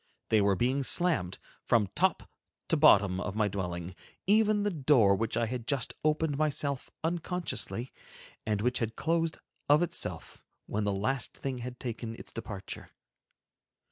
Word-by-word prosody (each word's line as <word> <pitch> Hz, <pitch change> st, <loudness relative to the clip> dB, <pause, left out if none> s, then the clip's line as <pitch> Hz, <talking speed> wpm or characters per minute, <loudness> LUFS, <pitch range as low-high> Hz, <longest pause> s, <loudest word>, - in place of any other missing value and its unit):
They 110 Hz, -2 st, +4 dB
were 100 Hz, -1 st, +3 dB
being 130 Hz, +7 st, +1 dB
slammed 140 Hz, -, +1 dB, 0.3 s
from 115 Hz, -3 st, +3 dB
top 190 Hz, -1 st, +1 dB, 0.4 s
to -, -, +4 dB
bottom 105 Hz, -, +5 dB
of 100 Hz, +2 st, -4 dB
my 110 Hz, -1 st, +2 dB
dwelling, 90 Hz, -2 st, -4 dB, 0.3 s
even 210 Hz, 0 st, +4 dB
the 205 Hz, -, +1 dB
door 130 Hz, -, +4 dB
which 115 Hz, +2 st, -1 dB
I 115 Hz, -, +2 dB
had 115 Hz, 0 st, -5 dB
just 140 Hz, -5 st, 0 dB
opened 155 Hz, -1 st, +1 dB
myself 145 Hz, -3 st, 0 dB
unconsciously, 170 Hz, -6 st, -2 dB, 0.5 s
and 105 Hz, -2 st, -1 dB
which 125 Hz, +2 st, +1 dB
had 115 Hz, -1 st, -2 dB
closed 165 Hz, 0 st, 0 dB, 0.3 s
of 150 Hz, +4 st, +6 dB
itself, 175 Hz, -, -4 dB, 0.2 s
when 105 Hz, 0 st, -2 dB
the 100 Hz, -, +1 dB
last 110 Hz, +7 st, -2 dB
thing 130 Hz, -2 st, -4 dB
had 125 Hz, +1 st, -7 dB
taken 115 Hz, -2 st, -5 dB
its -, -, -11 dB
departure. 105 Hz, -4 st, -7 dB
125 Hz, 150 wpm, -30 LUFS, 105-155 Hz, 0.5 s, of